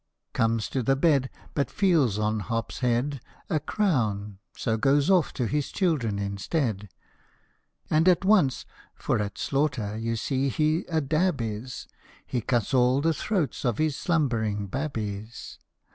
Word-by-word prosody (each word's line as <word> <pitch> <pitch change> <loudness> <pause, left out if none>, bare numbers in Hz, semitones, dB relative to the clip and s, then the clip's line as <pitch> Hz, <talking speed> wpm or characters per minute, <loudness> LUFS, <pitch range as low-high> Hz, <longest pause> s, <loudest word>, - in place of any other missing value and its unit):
Comes 115 -1 +1
to 130 - -1
the 135 +3 +2
bed, 135 -3 +2 0.2
But 140 - 0
feels 160 - +2
on 105 0 0
Hop's 115 +3 -3
head 125 +2 0 0.3
A 155 - +2
crown, 110 - -1 0.2
so 110 - 0
goes 140 - +3
off 180 -4 +3
to 125 - -1
his 145 +5 -1
children 145 - 0
instead, 100 - -2 1.0
And 160 +4 +4
at 180 +1 +3
once 185 -11 +3 0.3
for - - -1
at 105 -1 -3
slaughter 125 -7 -1
you 115 +1 -2
see 135 +4 0
he 155 +5 +1
a 160 -2 0
dab 155 +2 +1
is 115 +2 -5 0.4
He 125 - -2
cuts 120 0 0
all 125 +1 +4
the 165 +2 +2
throats 160 - -2
of 120 -5 0
his 155 -2 +1
slumbering 115 - 0
babbies. 110 -3 -5
130 Hz, 145 wpm, -26 LUFS, 110-155 Hz, 1.0 s, And